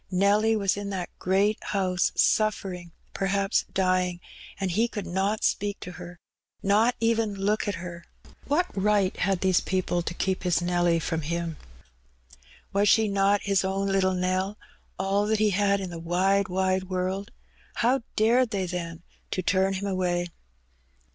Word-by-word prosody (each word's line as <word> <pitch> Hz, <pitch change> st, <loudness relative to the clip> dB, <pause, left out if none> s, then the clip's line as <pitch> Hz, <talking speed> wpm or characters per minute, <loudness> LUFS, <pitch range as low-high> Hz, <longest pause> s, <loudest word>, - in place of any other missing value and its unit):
Nelly 205 Hz, +4 st, +3 dB
was 200 Hz, -2 st, +1 dB
in 205 Hz, 0 st, -4 dB
that 185 Hz, -3 st, -4 dB
great 200 Hz, +3 st, +1 dB
house 185 Hz, -3 st, 0 dB
sufiering, 195 Hz, -5 st, +1 dB, 0.2 s
perhaps 195 Hz, +1 st, 0 dB
dying; 185 Hz, -2 st, +1 dB, 0.4 s
and 190 Hz, -2 st, -1 dB
he 220 Hz, +7 st, +2 dB
could 210 Hz, -3 st, -5 dB
not 195 Hz, +4 st, -1 dB
speak 205 Hz, 0 st, 0 dB
to 180 Hz, -, -7 dB
her 180 Hz, -1 st, -10 dB, 0.3 s
— -, -, -42 dB
not 230 Hz, +4 st, +4 dB
even 225 Hz, -2 st, +1 dB
look 205 Hz, +3 st, 0 dB
at 205 Hz, -, -1 dB
her. 170 Hz, 0 st, -8 dB, 0.4 s
What 310 Hz, +6 st, +2 dB
right 200 Hz, -1 st, +2 dB
had 195 Hz, -1 st, 0 dB
these 185 Hz, -2 st, +3 dB
people 185 Hz, -2 st, -1 dB
to 170 Hz, 0 st, -5 dB
keep 190 Hz, 0 st, -1 dB
his 180 Hz, -2 st, +1 dB
Nelly 175 Hz, -1 st, +2 dB
from 165 Hz, 0 st, -2 dB
him? 170 Hz, +1 st, -3 dB, 1.2 s
Was 200 Hz, +2 st, +5 dB
not 200 Hz, -2 st, +2 dB
she -, -, -8 dB
his 195 Hz, -1 st, +2 dB
own 195 Hz, +1 st, -1 dB
little 190 Hz, -1 st, +2 dB
Nell, 185 Hz, +3 st, -1 dB, 0.4 s
all 195 Hz, +2 st, +1 dB
that 220 Hz, 0 st, +2 dB
he 215 Hz, 0 st, +2 dB
had 200 Hz, +1 st, +2 dB
in 190 Hz, -2 st, -5 dB
the 170 Hz, -, -6 dB
wide, 185 Hz, +4 st, +1 dB
wide 185 Hz, 0 st, 0 dB
world? 185 Hz, +2 st, -3 dB, 0.4 s
How 245 Hz, +3 st, +2 dB
dared 235 Hz, +3 st, +3 dB
they, 195 Hz, -3 st, -1 dB
then, 170 Hz, -2 st, -5 dB, 0.3 s
to 185 Hz, -, -2 dB
turn 190 Hz, +2 st, +2 dB
him 195 Hz, +1 st, -3 dB
away 180 Hz, -2 st, -1 dB
190 Hz, 160 wpm, -26 LUFS, 180-205 Hz, 1.2 s, Was